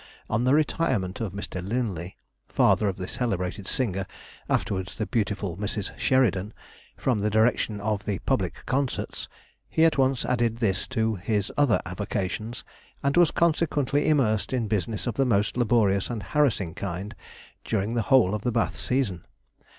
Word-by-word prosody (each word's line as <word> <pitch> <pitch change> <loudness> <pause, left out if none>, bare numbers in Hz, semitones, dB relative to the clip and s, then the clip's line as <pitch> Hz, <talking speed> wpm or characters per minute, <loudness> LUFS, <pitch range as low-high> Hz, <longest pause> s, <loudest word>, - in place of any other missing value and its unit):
On 115 +2 +1
the 130 +3 +5
retirement 130 - 0
of 110 -5 -2
Mr. 95 -2 -5
Linley 95 -5 -3 0.3
(father 105 - +3
of 95 - -4
the 90 -1 -5
celebrated 100 -5 -2
singer, 95 -7 -1 0.4
afterwards 95 -2 -1
the 110 - -1
beautiful 105 -6 -1
Mrs. 105 0 -3
Sheridan) 110 -6 +1 0.4
from 125 -5 +1
the 105 +1 +1
direction 110 -1 +2
of 105 0 -1
the 100 -2 -1
Public - - -1
Concerts, 135 0 -2 0.4
he 160 - +4
at 160 -3 +3
once 130 -1 +2
added 120 -2 +1
this 100 -6 0
to 110 -4 0
his 105 +2 -1
other 145 -6 +3
avocations, 100 +4 -3 0.4
and 140 +1 +1
was 175 -2 +6
consequently 150 -4 +1
immersed 130 -8 +2
in 120 -4 0
business 105 0 -2
of 120 - -1
the 135 - +2
most 105 -5 +1
laborious 110 -5 +2
and 115 -4 -4
harassing 105 - +1
kind 95 +2 -5 0.5
during 110 0 -1
the 120 - +1
whole 115 -5 +4
of 105 - -2
the 125 - 0
Bath 115 0 0
season. 115 - -1
110 Hz, 160 wpm, -26 LUFS, 100-125 Hz, 0.5 s, was